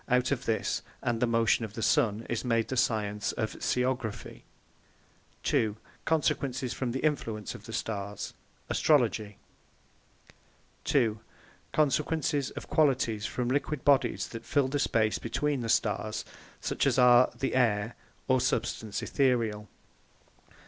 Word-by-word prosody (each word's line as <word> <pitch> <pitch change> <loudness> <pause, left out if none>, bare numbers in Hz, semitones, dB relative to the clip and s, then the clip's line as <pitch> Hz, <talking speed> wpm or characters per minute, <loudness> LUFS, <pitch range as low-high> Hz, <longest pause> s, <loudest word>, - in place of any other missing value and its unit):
Out 125 +1 +2
of 135 -1 -1
this, 115 -3 0 0.2
and 120 -1 0
the 125 - +3
Motion 115 0 +2
of 110 -2 -6
the 115 - -3
Sunne, 110 +1 +2
is 120 - -2
made 115 -3 +1
the 130 - -2
Science 105 -4 0
of 110 - -3
SCIOGRAPHY 125 -4 -2 1.1
b) 110 -2 +2 0.3
Consequences 135 -5 0
from 125 -3 -2
the 130 - -3
Influence 115 -9 -1
of - - -11
the - - -7
Starres, 100 -2 -4 0.4
ASTROLOGY 110 -8 +2 1.5
2) 115 -5 +2 0.5
Consequences 150 -1 +1
of - - -7
the - - -12
Qualities 125 -8 +2
from 125 -1 -2
Liquid 140 +1 -1
Bodies 135 -4 +3
that 115 0 -7
fill 140 0 +1
the 145 +2 -1
space 110 -4 +1
between 145 -3 -1
the 115 - -3
Starres; 110 0 0 0.3
such - - 0
as 130 -2 +2
are 125 0 +7
the 135 - -1
Ayre, 110 -3 +2 0.3
or 130 -1 +3
substance 110 -4 -1
aetherial. 115 -6 +1
120 Hz, 135 wpm, -29 LUFS, 110-130 Hz, 1.5 s, are